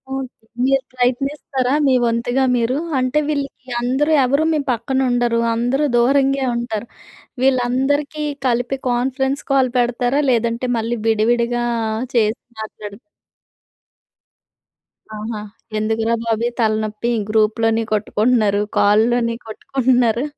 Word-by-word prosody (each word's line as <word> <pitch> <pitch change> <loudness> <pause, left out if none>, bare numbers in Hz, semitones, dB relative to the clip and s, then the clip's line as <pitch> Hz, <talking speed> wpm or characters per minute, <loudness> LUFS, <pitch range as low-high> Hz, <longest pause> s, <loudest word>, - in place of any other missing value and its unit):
Okay. 270 0 -3 0.4
మీరు 270 0 +2
ప్రయత్నిస్తారా, 260 +1 -1
మీ 265 - +4
వంతుగా 235 +3 0
మీరు? 240 +2 0 0.2
అంటే 255 +3 +1
వీళ్ళకి 280 -3 -4
అందరూ 265 +6 +1
ఎవరు 280 +4 +2
మీ 310 - +1
పక్కన 245 +3 -1
ఉండరు. 240 -1 +1 0.2
అందరూ 245 +5 +1
దూరంగే 275 +2 +3
ఉంటారు. 235 -2 -3 0.6
వీళ్ళందరికీ 270 +4 +1 0.2
కలిపి 245 +2 0
కాన్ఫరెన్స్ 265 +3 -1
కాల్ 265 -2 +3
పెడతారా? 245 +3 +1
లేదంటే, 235 0 0
మళ్ళీ 230 +2 -2
విడివిడిగా 235 +2 +1 0.5
చేసి 220 0 +2 0.2
మాట్లాడు 210 -2 -8 2.2
ఆహా! 215 0 -5 0.4
ఎందుకురా 225 +1 0
బాబు 225 -1 -1
ఈ - - 0
తలనొప్పి, 215 0 0 0.2
గ్రూప్‌లోని 225 +1 +2
కొట్టుకుంటున్నారు. 210 -1 +1 0.2
కాల్‌ల్లోని 230 +3 +3
కొట్టుకుంటున్నారు. 245 0 +1
240 Hz, 105 wpm, -19 LUFS, 225-265 Hz, 2.2 s, మీ